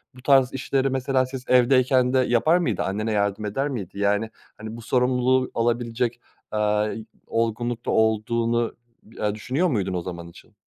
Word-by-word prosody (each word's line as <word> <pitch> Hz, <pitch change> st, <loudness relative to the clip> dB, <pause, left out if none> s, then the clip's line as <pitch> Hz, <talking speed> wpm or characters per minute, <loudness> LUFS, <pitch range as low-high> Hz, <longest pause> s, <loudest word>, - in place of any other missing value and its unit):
bu 125 Hz, -, -13 dB
tarz 135 Hz, -2 st, +4 dB
işleri 135 Hz, 0 st, 0 dB
mesela 130 Hz, 0 st, +1 dB
siz 130 Hz, 0 st, -8 dB
evdeyken 130 Hz, 0 st, +4 dB
de 130 Hz, -, +4 dB
yapar 130 Hz, +7 st, +3 dB
mıydı, 175 Hz, -, -1 dB
annene 110 Hz, +3 st, -2 dB
yardım 100 Hz, 0 st, 0 dB
eder 135 Hz, +8 st, -1 dB
miydi, 100 Hz, -6 st, -6 dB
yani, 105 Hz, +2 st, +1 dB, 0.3 s
hani, 110 Hz, +1 st, -7 dB
bu 115 Hz, -, -9 dB
sorumluluğu 125 Hz, +2 st, +1 dB
alabilecek, 120 Hz, 0 st, -1 dB, 0.3 s
eee, 105 Hz, +1 st, 0 dB, 0.2 s
olgunlukta 115 Hz, +1 st, -1 dB
olduğunu, 115 Hz, +2 st, +1 dB, 0.4 s
ııı, 105 Hz, 0 st, -1 dB
düşünüyor 130 Hz, +12 st, 0 dB
muydun 100 Hz, -, -1 dB
o 90 Hz, -, -2 dB
zaman 85 Hz, -1 st, -7 dB
için? 85 Hz, -, -16 dB
120 Hz, 150 wpm, -24 LUFS, 105-130 Hz, 0.4 s, tarz